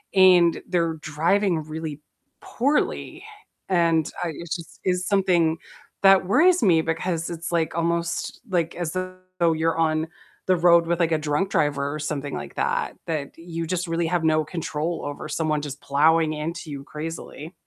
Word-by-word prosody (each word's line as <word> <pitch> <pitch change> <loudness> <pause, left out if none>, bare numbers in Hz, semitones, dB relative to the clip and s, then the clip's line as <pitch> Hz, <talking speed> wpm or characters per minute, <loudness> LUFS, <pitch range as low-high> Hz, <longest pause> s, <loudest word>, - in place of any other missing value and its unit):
and 180 -3 +6
they're 170 -2 +1
driving 165 +4 +1
really 155 -1 -5 0.6
poorly, 280 +5 +1 0.7
and, 165 -2 +2
uh, 170 - -1
it’s 170 -2 -4
just 165 - -11 0.2
is 180 - 0
something 185 -4 +3 0.6
that 195 -1 +6
worries 360 - +5
me, 165 - +5
because 165 +1 -2
it's 170 0 -5
like 160 -1 0
almost, 170 0 -1
like, 170 -3 0
as 165 - -2
though 185 -2 -2
you're 165 0 +1
on 155 - 0 0.5
the 185 - +4
road 170 -1 +6
with, 170 0 0
like, 165 -1 +2
a 160 - +3
drunk 150 +7 +1
driver 140 -1 +1
or 155 - -5
something 145 -2 -3
like 70 - -10
that, - - 0 0.2
that 150 -3 -1
you 165 -1 -5
just 180 0 -2
really 165 0 0
have 175 -2 +1
no 155 - +3 0.2
control 165 0 -3
over 145 0 -6
someone 155 -1 0
just 145 -1 -6
plowing 155 +3 +3
into 155 +1 -5
you 140 -1 -6
crazily. 160 +1 -7
165 Hz, 165 wpm, -24 LUFS, 155-175 Hz, 0.7 s, and